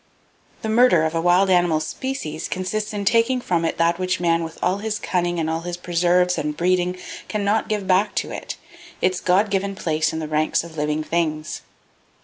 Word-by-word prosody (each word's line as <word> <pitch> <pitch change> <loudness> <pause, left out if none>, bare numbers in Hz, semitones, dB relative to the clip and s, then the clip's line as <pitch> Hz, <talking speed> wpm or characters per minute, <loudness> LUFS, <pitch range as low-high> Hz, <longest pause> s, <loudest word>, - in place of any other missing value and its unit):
The - - -2
murder 220 -8 +5
of 160 - -1
a 165 - 0
wild 180 +3 +4
animal 175 -3 +3
species 210 - -4
consists 210 +3 -3
in 205 -1 -4
taking 230 +4 +3
from 175 -8 0
it 165 - -1
that 170 +1 +2
which 185 -1 0
man 170 -1 +2
with 165 0 -7
all 185 +3 0
his 215 0 -2
cunning 175 -3 -1
and 160 - -1
all 160 +1 -1
his 175 0 -5
preserves 175 +1 +2
and 150 0 -3
breeding 180 +1 +1 0.3
can 210 -2 -2
not 210 +2 +1
give 210 -2 -1
back 195 +2 +2
to - - -2
it,—its 345 - -4
God 195 +3 +2
given 195 0 -1
place 160 -3 0
in - - -4
the 160 -1 -3
ranks 155 +1 +1
of 170 -1 -11
Living 150 0 -1
Things. 155 -2 -2
180 Hz, 195 wpm, -22 LUFS, 165-200 Hz, 0.3 s, murder